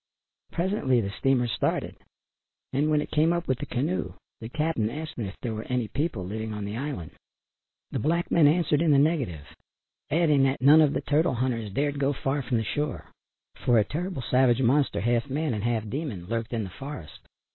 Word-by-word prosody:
Presently 170 - +1
the 100 -3 -2
steamer 125 +2 +1
started 115 - -1 0.8
and 145 +3 +2
when 150 -1 +3
it - - -6
came 155 +2 +3
up 170 0 -1
with 130 -2 0
the - - -5
canoe 150 +9 -2 0.2
the 115 - -7
"cap'n" 150 -6 0
asked 155 +5 -6
them 115 -5 -3
if 95 - -8
there 115 -3 -2
were 110 0 -6
any 125 -3 0
people 135 - -2
living 110 +3 -4
on 105 -1 -4
the 100 +1 -4
island. 130 - -4 0.8
The - - -2
black 170 +3 0
men 160 -4 +6
answered 155 -1 +2
in 165 - +2
the 145 - +6
negative, 135 - +1 0.6
adding 150 -3 +3
that 135 +1 0
none 145 +4 +7
of 150 -2 +4
the - - -1
turtle 150 0 +1
hunters 115 -4 -1
dared 145 +6 -1
go 140 +1 +2
far 135 +1 -1
from 120 -3 -1
shore, 145 +6 -3 0.5
for 120 - +4
a 110 - +5
terrible 170 - -4
savage 130 0 +3
monster 125 -4 +2
half 120 +4 +1
man 150 0 -1
and 105 -2 -3
half 115 -2 0
demon, 115 - -4
lurked 115 +3 -3
in 115 -2 -1
the 95 - -7
forest. 135 - -8
135 Hz, 200 wpm, -27 LUFS, 115-150 Hz, 0.8 s, none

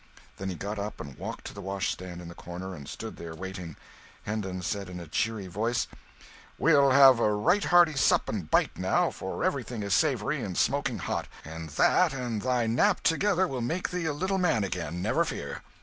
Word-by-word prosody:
Then 95 0 -4
he 90 - -4
got 100 +4 -4
up 105 +1 -5
and 70 -3 -8
walked - - -7
to - - -6
the - - -8
washstand 95 -2 -3
in - - -9
the 85 - -8
corner 90 +2 -7
and 70 -6 -9
stood - - -7
there, 85 -1 -7
waiting. 90 -3 -7 0.5
Hendon 95 -4 -3
said 100 +1 -3
in 90 -1 -7
a 85 - -7
cheery 105 +5 -1
voice 115 +6 -1 0.7
"We'll 140 -4 +5
have 135 -2 +8
a 110 - +3
right 140 - +2
hearty 175 -3 +5
sup 135 - +3
and 95 -8 -4
bite, - - +2
now, - - +2
for - - -5
everything 115 -4 -1
is 100 -1 0
savoury 140 +1 +1
and 95 -3 -4
smoking - - +1
hot, - - -3 0.2
and 80 +1 -7
that 75 - +3
and 120 -5 -3
thy 125 -1 +1
nap 150 - +2
together 190 +2 +2
will 130 -5 -3
make 165 +10 -2
thee 180 -2 -2
a 160 - +1
little 190 +6 -1
man 160 - +2
again, 90 -2 -3
never - - +2
fear!" - - -5
105 Hz, 200 wpm, -28 LUFS, 90-135 Hz, 0.7 s, have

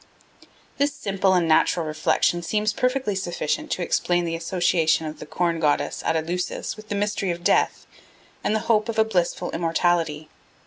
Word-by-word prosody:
This 285 0 +2
simple 195 -7 +1
and 175 -2 +2
natural 160 +1 +3
reflection 155 +2 +1
seems 210 +5 0
perfectly 255 -3 0
sufficient 190 - -2
to 185 - -1
explain 175 0 +1
the 165 0 -2
association 165 -1 +1
of 155 0 -6
the - - -9
Corn 170 -2 0
Goddess 145 -2 0
at 165 - +1
Eleusis 175 +6 -2
with 215 0 -13
the 205 - -2
mystery 205 -1 -1
of 175 0 -3
death - - +2 0.6
and 215 - +1
the 220 - 0
hope 220 -1 +2
of 225 - -3
a 220 - +4
blissful 180 -3 -1
immortality. 165 -2 0
175 Hz, 170 wpm, -24 LUFS, 165-210 Hz, 0.6 s, a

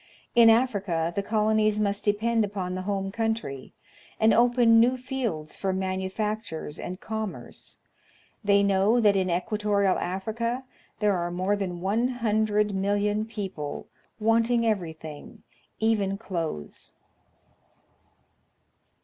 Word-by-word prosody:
In 235 -1 +7
Africa 200 -8 +1
the 200 - +1
colonies 215 0 +2
must 205 -1 0
depend 220 +2 +1
upon 195 -3 -3
the 185 - -3
home 195 0 -2
country, 220 - -3 0.5
and 220 0 +5
open 235 -1 +5
new 250 +3 +4
fields 245 -12 -3
for 195 - -1
manufactures 190 -2 -3
and 185 +1 -6
commerce. 220 -2 -6 0.7
They 200 0 +4
know 200 +4 +3
that 205 -3 +4
in 190 -1 +1
equatorial 200 +2 +1
Africa 230 +7 -3 0.4
there 205 -2 +3
are 175 -1 -2
more 185 +3 0
than 180 -4 -4
100,000,000 210 -2 0
people 190 -9 -5 0.3
wanting 230 +2 +2
every 190 -7 0
thing, 155 -2 -11 0.4
even 210 -3 +1
clothes. 165 - -5
205 Hz, 110 wpm, -26 LUFS, 190-225 Hz, 0.7 s, In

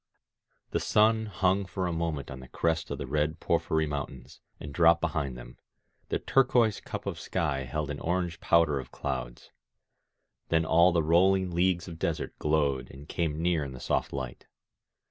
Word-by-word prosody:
The - - +1
sun 110 +1 +3
hung 95 0 +1
for 95 +1 -3
a 90 - -1
moment 80 -5 -3
on 65 - -7
the 65 - -11
crest 80 +3 -1
of - - -3
the - - -4
red 75 +3 -1
porphyry 80 0 +1
mountains, 70 -4 -6 0.2
aid 75 -1 -8
dropped 85 +1 +5
behind 80 -7 -2
them; - - -12 0.5
the - - +1
turquoise 120 -5 +3
cup - - -6
of - - -4
sky 65 -1 -1
held 75 +3 -3
an 70 - -5
orange 90 0 -1
powder 80 -4 +3
of 65 - -8
clouds. - - -5 1.0
Then 80 0 +2
all 85 +3 +5
the 85 -2 +2
rolling 95 +3 +3
leagues 85 0 +1
of 85 -2 -8
desert - - -2
glowed 75 -4 +1
and 70 +2 -12
came 80 -2 -2
near 85 -3 +2
in 70 -1 -6
the 65 - -9
soft - - -1
light. 65 -3 -6
80 Hz, 175 wpm, -29 LUFS, 70-90 Hz, 1.0 s, dropped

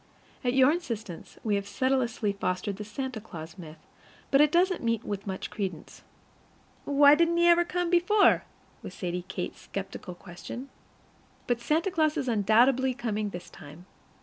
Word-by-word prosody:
At 245 -1 +1
your 265 +1 +6
insistence, 230 - -5
we 215 - 0
have 200 0 -1
sedulously 235 -2 0
fostered 195 +1 -2
the 210 - -5
Santa 245 +2 -5
Claus 165 -3 -10
myth, 160 -2 -10 0.5
but 275 0 +6
it 300 -1 +5
doesn't 365 +2 +2
meet 230 -1 0
with 200 0 -5
much 190 -1 -5
credence. 185 -6 -5 0.8
"Why 285 0 +6
didn't 335 +2 +3
he 345 - +4
ever 345 0 +6
come 355 0 -2
before?" 380 +4 +4 0.4
was - - -9
Sadie 180 -1 -4
Kate's 185 -1 -5
skeptical 195 -2 -7
question. 200 +9 -9 0.8
But 240 -1 -1
Santa 325 +9 +1
Claus 310 -4 +1
is 265 - -2
undoubtedly 240 +4 +3
coming 215 -5 -2
this 175 -2 -9
time. 155 +3 -13
235 Hz, 155 wpm, -28 LUFS, 195-290 Hz, 0.8 s, your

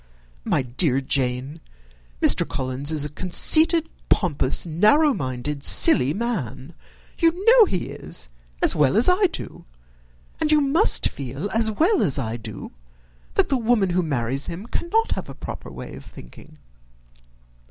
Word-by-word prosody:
My 140 - 0
dear 130 +2 0
Jane, 135 +3 -3 0.6
Mr. - - +5
Collins 130 +3 -3
is 150 -2 -1
a - - -5
conceited, 315 - +3 0.2
pompous, 150 -7 +1
narrow 215 - +3
minded, 135 - -5
silly 130 -1 +4
man: 170 - -4 0.5
you 340 +3 +1
know 470 -1 +7
he 185 - -3
is, - - -6 0.4
as - - +2
well 150 +4 +2
as 225 - +3
I 370 +2 +3
do; 345 - -8 0.8
and 310 -1 +1
you 305 - +5
must 285 +3 +3
feel, 140 +8 -6
as 225 0 +1
well 330 - +1
as 140 - +2
I 115 -4 -3
do, 115 - -9 0.6
that - - +2
the 270 - +1
woman 225 -5 +1
who 180 +1 +1
marries 135 -3 -2
him 180 +5 -7
cannot 435 - -1
have - - -4
a - - -9
proper - - -8
way - - -9
of - - -11
thinking. 155 -1 -15
170 Hz, 150 wpm, -22 LUFS, -, 0.8 s, know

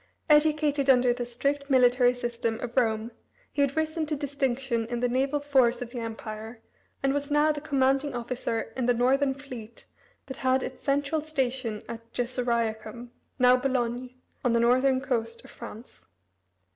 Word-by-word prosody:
Educated 300 -2 +3
under 250 -2 +5
the 245 0 -4
strict 280 +4 -2
military 250 -1 +4
system 235 -2 -2
of 240 -1 -5
Rome, 225 -2 +1 0.4
he 285 - -1
had 280 +1 +1
risen 315 0 -1
to 305 - -1
distinction 270 -4 -1
in 240 0 -3
the 245 - +1
naval 270 +4 0
force 260 -4 +3
of 245 -1 -6
the 245 - -5
Empire, 225 0 -6 0.4
and 270 0 +2
was 285 0 -2
now 295 +1 +4
the 295 -1 -4
commanding 275 -1 +1
officer 235 -2 -3
in 255 -2 -1
the 245 - +3
northern 265 +3 +2
fleet 250 -5 -10 0.4
that 265 -1 -8
had 260 0 +1
its - - -7
central 285 +2 0
station 260 -7 -2
at 230 0 -9
Gessoriacum, 235 -2 -2 0.3
now 250 -1 +6
Boulogne, 250 -1 -1 0.3
on 245 - +2
the 235 - +3
northern 255 +3 +3
coast 230 -4 -2
of - - -13
France. 225 +4 -11
255 Hz, 160 wpm, -27 LUFS, 235-275 Hz, 0.4 s, now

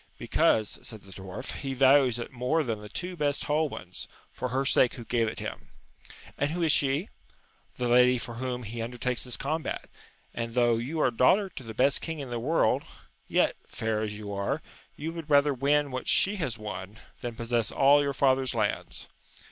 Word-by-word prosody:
Because, 110 -2 +1
said 110 -3 -8
the 100 - -15
dwarf, 95 0 -7
he 135 -1 -3
values 135 -2 +5
it 120 - -6
more 130 +6 +1
than 115 -5 -3
the 105 - -9
two 180 - -4
best 145 -3 0
whole 150 +1 +1
ones, 90 -7 -8 0.2
for 125 - -3
her 135 +2 0
sake 125 -2 +3
who 120 - -8
gave 115 -1 +1
it 110 - -4
him. - - -6 0.3
— - - -18
^And 145 - +2
who 170 +2 -2
is 160 - +4
she? 145 +8 +2 0.3
— - - -35
The 125 - -1
lady 125 +1 +5
for 120 0 -6
whom 125 +1 -4
he 115 +2 -5
undertakes 125 +1 -2
this 125 -4 -3
combat, 155 +3 -3 0.5
and 115 0 -4
though 120 -2 +4
you 135 +8 -3
are 130 - +3
daughter 185 - +4
to 170 - -9
the 115 -3 -8
best 135 +4 +3
king 165 -1 -4
in 135 -4 -6
the 120 - -2
world, 155 +8 +2 0.5
yet, - - +2
fair 110 -1 -2
as 105 -1 -3
you 105 -1 -6
are, 100 +10 -2 0.3
you 160 +3 -5
would 165 -2 -7
rather 145 0 +5
win 140 +2 +2
what 130 - -4
she 205 +2 +3
has 150 -10 -2
won, 105 -1 -7 0.2
than 120 -1 -4
possess 115 -1 -1
all 140 +1 +5
your 140 -1 0
father's 130 -1 +2
lands. 105 -3 -2
125 Hz, 205 wpm, -28 LUFS, 115-145 Hz, 0.5 s, values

